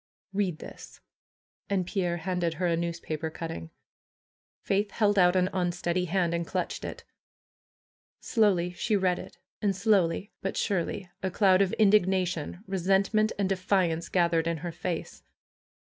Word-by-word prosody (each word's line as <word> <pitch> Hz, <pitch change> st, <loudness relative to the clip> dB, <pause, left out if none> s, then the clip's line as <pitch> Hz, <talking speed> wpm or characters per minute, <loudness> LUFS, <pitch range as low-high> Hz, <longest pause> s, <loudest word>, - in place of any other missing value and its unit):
"Read 190 Hz, -5 st, 0 dB
this!" -, -, -11 dB, 0.7 s
And 190 Hz, -3 st, +1 dB
Pierre 175 Hz, -2 st, -1 dB
handed 175 Hz, -1 st, -1 dB
her 180 Hz, +3 st, -1 dB
a 170 Hz, -1 st, +2 dB
newspaper 165 Hz, -2 st, -3 dB
cutting. 120 Hz, -, -6 dB, 0.9 s
Faith 200 Hz, +1 st, +1 dB
held 205 Hz, -1 st, +2 dB
out 180 Hz, 0 st, +5 dB
an 185 Hz, 0 st, +3 dB
unsteady 175 Hz, 0 st, 0 dB
hand 175 Hz, -1 st, +1 dB
and 170 Hz, 0 st, 0 dB
clutched -, -, -3 dB
it. -, -, -6 dB, 1.2 s
Slowly 195 Hz, -7 st, +2 dB
she 210 Hz, +5 st, 0 dB
read 185 Hz, -3 st, +2 dB
it, -, -, -10 dB, 0.2 s
and 200 Hz, -2 st, +1 dB
slowly, 195 Hz, -2 st, +2 dB
but 195 Hz, -, -3 dB
surely 200 Hz, 0 st, -1 dB
a 190 Hz, -, -1 dB
cloud 190 Hz, 0 st, +4 dB
of 190 Hz, -2 st, +2 dB
indignation, 190 Hz, -4 st, +2 dB
resentment, 195 Hz, +3 st, +2 dB
and 200 Hz, -2 st, +1 dB
defiance 185 Hz, -3 st, 0 dB
gathered 170 Hz, -2 st, +2 dB
in 170 Hz, -1 st, 0 dB
her 175 Hz, -, -2 dB
face. 170 Hz, 0 st, -5 dB
185 Hz, 140 wpm, -28 LUFS, 170-195 Hz, 1.2 s, out